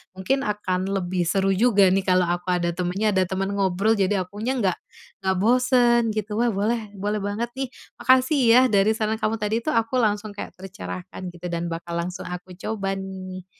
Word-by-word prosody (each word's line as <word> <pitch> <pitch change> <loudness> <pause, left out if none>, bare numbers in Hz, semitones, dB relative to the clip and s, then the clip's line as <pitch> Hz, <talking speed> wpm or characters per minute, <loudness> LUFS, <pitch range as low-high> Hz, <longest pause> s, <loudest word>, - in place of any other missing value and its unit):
Mungkin 265 +9 -1
akan 190 -3 -1
lebih 185 -3 -1
seru 195 +3 +2
juga 200 -2 +4
nih 195 0 +1
kalau 185 0 +4
aku 175 +2 -2
ada 170 -1 0
temennya, 180 +5 0
ada 190 -2 +2
teman 195 +1 -2
ngobrol, 195 +1 +1
jadi 195 -1 +1
akunya 215 +7 -3
enggak 195 -8 0 0.4
enggak 190 -1 0
bosan 245 +1 +4
gitu. 215 0 -2
Wah, 240 - +3
boleh, 210 0 -1
boleh 205 +2 -2
banget 205 +4 -3
nih. 270 - -1 0.3
Makasih 260 +3 +4 0.2
ya 255 - +8
dari 205 +2 +3
saran 220 0 -1
kamu 220 0 0
tadi 215 +1 -1
tuh 270 +5 -2
aku 230 +3 +1
langsung 210 -1 0
kayak 200 - -8
tercerahkan 90 - -8
gitu, 175 0 -9
dan 170 0 -2
bakal 170 0 -4
langsung 180 +1 -4
aku 180 0 -7
coba 195 0 -3
nih. 185 -1 -7
195 Hz, 185 wpm, -24 LUFS, 185-220 Hz, 0.4 s, ya